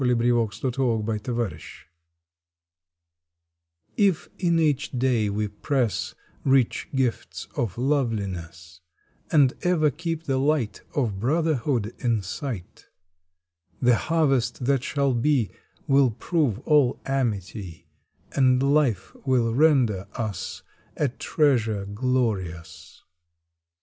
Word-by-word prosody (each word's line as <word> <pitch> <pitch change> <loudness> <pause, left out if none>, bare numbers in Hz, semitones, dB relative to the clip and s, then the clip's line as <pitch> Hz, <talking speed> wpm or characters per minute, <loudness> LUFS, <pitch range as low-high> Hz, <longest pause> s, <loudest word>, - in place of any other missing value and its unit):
April 125 -1 +3 0.3
Twenty 115 +5 -4
fourth 115 -4 0
THE 125 - -3
HARVEST 120 -4 -4 2.1
TF 195 -5 +2
in 170 -2 +2
each 150 -3 +1
day 120 -4 +1
we 105 +1 -1
press 120 +2 -1 0.3
Rich 135 +1 +2
gifts 130 -3 -2
of 110 -5 -2
loveliness, 95 - -2 0.5
And 140 -4 +5
ever 165 -5 +2
keep 165 +1 -4
the 135 -4 0
light 140 -5 0
Of 115 -9 0
Brotherhood 130 -4 0
in 115 -5 0
sight, 105 - -6 0.9
The 125 -1 +4
harvest 135 -5 +1
that 135 -1 +2
shall 140 -2 0
be 120 -2 +1 0.3
Will 135 -1 +4
prove 135 - 0
all 145 -4 +3
amity, 100 -9 -3 0.5
And 130 -1 +3
life 130 -11 +1
will 125 -4 +2
render 125 -9 +3
us 110 -4 -4 0.3
A 145 - +1
treasure 120 -7 +1
glorious. 100 -7 -3
125 Hz, 105 wpm, -25 LUFS, 105-140 Hz, 2.1 s, And